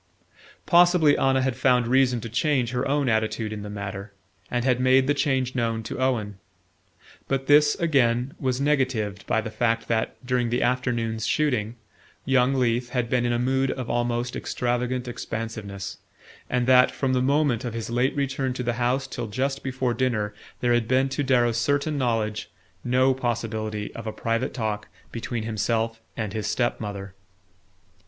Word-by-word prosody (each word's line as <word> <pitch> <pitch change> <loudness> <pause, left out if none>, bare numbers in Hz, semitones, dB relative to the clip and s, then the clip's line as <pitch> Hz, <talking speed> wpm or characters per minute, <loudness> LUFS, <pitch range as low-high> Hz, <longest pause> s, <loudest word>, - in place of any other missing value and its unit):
Possibly 175 -4 +5
Anna 130 -1 +2
had 130 -2 0
found 125 -1 +3
reason 125 -1 +3
to 115 - -5
change 125 0 +1
her 125 0 -1
own 140 0 +1
attitude 110 -1 0
in 105 - -6
the 105 - -7
matter, 100 0 -6 0.4
and 120 0 -1
had 125 -2 +2
made 130 +1 +4
the 145 - +2
change 130 -3 0
known 115 -3 -1
to 110 - -6
Owen. 110 -7 -1 0.9
But 135 0 -1
this, 145 +1 +5
again, 130 -5 +1
was 130 -1 -1
negatived 130 -9 0
by 110 - +2
the 110 0 -6
fact 115 +1 0
that, 110 -1 0
during 125 -1 +1
the 120 +2 0
afternoon's 120 -3 0
shooting, 120 -7 0 0.5
young 135 0 +3
Leath 120 -1 +1
had 125 -2 -2
been 120 -1 +2
in - - 0
a 120 - +1
mood 130 +2 +1
of 130 -2 -3
almost 120 +1 -1
extravagant 125 +1 -2
expansiveness, 110 -5 -5 0.5
and 125 -1 +1
that, 125 0 +6
from 135 -2 -1
the 125 - +2
moment 140 -3 +2
of 120 -3 -4
his 115 0 -4
late 125 +3 +1
return 135 -2 -1
to 125 - -4
the 120 0 0
house 130 +3 +1
till 120 -3 -5
just 135 +6 -2
before 130 -2 -1
dinner, 115 -5 -1 0.3
there 120 -1 +3
had 120 -2 +1
been, 130 +2 +2
to 130 +2 -2
Darrow's 120 -4 +2
certain 145 +5 +1
knowledge, 110 -4 -1 0.3
no 130 +2 +3
possibility 110 -4 -3
of 115 -1 -7
a - - -1
private 115 +4 -1
talk 105 -4 -2 0.2
between 115 -1 -4
himself 110 +1 -1 0.2
and 110 -4 -3
his 110 -2 -3
step 120 +2 0
mother. 100 -2 -6
120 Hz, 170 wpm, -25 LUFS, 115-130 Hz, 0.9 s, that